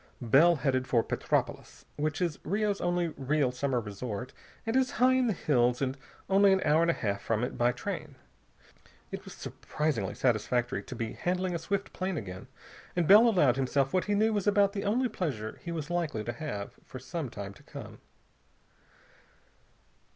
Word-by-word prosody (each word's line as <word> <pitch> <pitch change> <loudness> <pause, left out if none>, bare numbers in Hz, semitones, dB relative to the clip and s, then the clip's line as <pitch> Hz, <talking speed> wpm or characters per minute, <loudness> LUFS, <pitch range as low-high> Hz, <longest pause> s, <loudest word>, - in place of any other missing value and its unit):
Bell 150 +9 +6
headed 130 -3 0
for 115 -2 +3
Petropolis, - - -2
which 150 +3 -2
is 165 -5 -2
Rio's 205 +3 0
only 175 -1 +1
real 140 -2 0
summer 125 0 0
resort 110 +2 -5 0.3
and 225 +1 -1
is 260 -1 +2
high 255 +1 +4
in 260 -1 +3
the - - +2
hills 125 -7 +2
and 135 -1 -1 0.3
only 195 +1 +5
an 190 - +4
hour 155 +2 +4
and 170 - +3
a - - +4
half 100 -3 -2
from 115 0 0
it 125 - -3
by 120 +1 +3
train. 125 - -5 1.0
It - - -5
was - - -10
surprisingly 135 -11 -3
satisfactory 120 -2 0
to - - -8
be 115 -1 -3
handling 180 0 -1
a 170 - -1
swift 200 +4 -3
plane 185 -2 -2
again, 100 0 -7 0.5
and 175 -3 +1
Bell 215 +4 +8
allowed 145 - +3
himself 135 +1 +1
what 185 - +2
he 205 - +1
knew 220 +2 +3
was 205 -1 -1
about 200 -1 +4
the 200 -1 -3
only 245 +6 +2
pleasure 135 - -4
he 170 - -5
was 165 -1 -4
likely 155 -10 -1
to 120 - -4
have 110 -9 -5
for - - -9
some 135 +2 -5
time 100 -2 -7
to - - -18
come. - - -10
150 Hz, 180 wpm, -30 LUFS, 125-190 Hz, 1.0 s, Bell